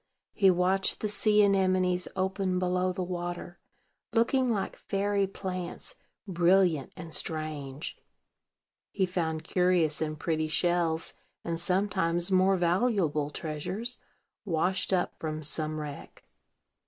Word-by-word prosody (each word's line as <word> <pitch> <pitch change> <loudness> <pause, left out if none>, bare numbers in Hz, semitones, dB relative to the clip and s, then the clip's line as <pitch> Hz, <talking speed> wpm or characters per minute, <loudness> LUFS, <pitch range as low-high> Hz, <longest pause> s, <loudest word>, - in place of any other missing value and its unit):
He 195 -3 +5
watched 185 +2 +2
the 215 - 0
sea 210 0 +3
anemones 185 -2 +2
open 190 0 0
below 180 0 +1
the 185 0 -3
water, 175 -1 -5 0.5
looking 245 +3 +3
like 205 -4 -1
fairy 200 0 0
plants, 185 -2 -5 0.3
brilliant 175 -4 +3
and 160 -1 -8
strange. 155 -3 -4 0.9
He 190 - +1
found 160 -3 -2
curious 175 -3 +2
and 155 -1 -2
pretty 155 -1 0
shells, 165 0 +1 0.3
and 165 -1 -2
sometimes 180 -1 +1
more 190 +1 +4
valuable 175 -5 +1
treasures, 175 +11 -4 0.4
washed 185 0 0
up 185 -2 +1
from 155 -1 -4
some 155 +1 -2
wreck. 145 -2 -8
180 Hz, 115 wpm, -29 LUFS, 160-190 Hz, 0.9 s, He